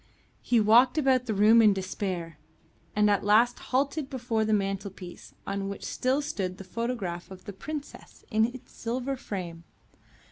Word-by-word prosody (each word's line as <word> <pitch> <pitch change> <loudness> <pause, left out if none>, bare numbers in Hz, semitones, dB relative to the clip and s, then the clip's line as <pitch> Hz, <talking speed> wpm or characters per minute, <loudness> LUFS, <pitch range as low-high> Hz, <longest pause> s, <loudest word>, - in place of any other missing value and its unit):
He 240 - +2
walked 240 +6 +5
about 260 -4 +2
the 220 - 0
room 215 +3 +6
in 210 -2 +6
despair, 185 -4 -4 0.6
and 210 0 +4
at 205 -1 +2
last 225 +4 +4
halted 275 +2 0
before 240 -4 -1
the 215 - -1
mantelpiece 195 -3 -3
on 195 0 -3
which 200 - -6
still 265 +3 0
stood 185 -9 -3
the - - -8
photograph 195 -4 -4
of 190 -1 -12
the 205 - -7
Princess 295 +9 -8
in 220 +1 +4
its 245 +2 -8
silver 250 +4 -3
frame. 180 -9 -6
215 Hz, 155 wpm, -28 LUFS, 195-250 Hz, 0.6 s, room